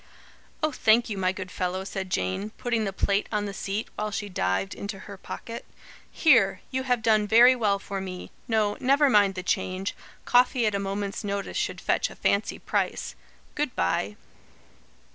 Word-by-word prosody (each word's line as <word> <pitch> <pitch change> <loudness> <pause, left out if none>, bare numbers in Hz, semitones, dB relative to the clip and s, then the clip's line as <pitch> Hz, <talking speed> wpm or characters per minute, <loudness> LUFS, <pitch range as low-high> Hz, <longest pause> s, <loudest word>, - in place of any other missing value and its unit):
"Oh, 310 - +2
thank 230 -2 +3
you, 205 - -3
my 185 -1 +2
good 185 -1 -7
fellow," 185 +1 -2
said 190 -1 -5
Jane, 95 - -1
putting 230 -3 0
the 195 - -1
plate 200 +1 0
on 210 -1 0
the 200 - -5
seat, 200 +3 -3
while 210 0 -2
she 205 0 -4
dived 95 - -1
into 200 0 -6
her 200 - -8
pocket. 230 +4 -7 0.5
"Here! 225 - +4
you 260 0 -1
have 245 -2 +2
done 215 -2 +3
very 240 +4 +7
well 210 -5 +2
for 195 0 -5
me. 185 -1 -7 0.2
No, 215 -2 +1
never 275 +2 +4
mind 205 -3 +4
the 185 - -4
change. 185 +1 -1 0.3
Coffee 245 0 +4
at 210 - +1
a 200 - 0
moment's 200 +1 -3
notice 200 -1 -3
should - - -1
fetch - - +1
a - - -11
fancy - - 0
price. - - -2 0.4
Good 295 -4 -2
bye." 95 +3 0
205 Hz, 180 wpm, -26 LUFS, 190-230 Hz, 0.5 s, very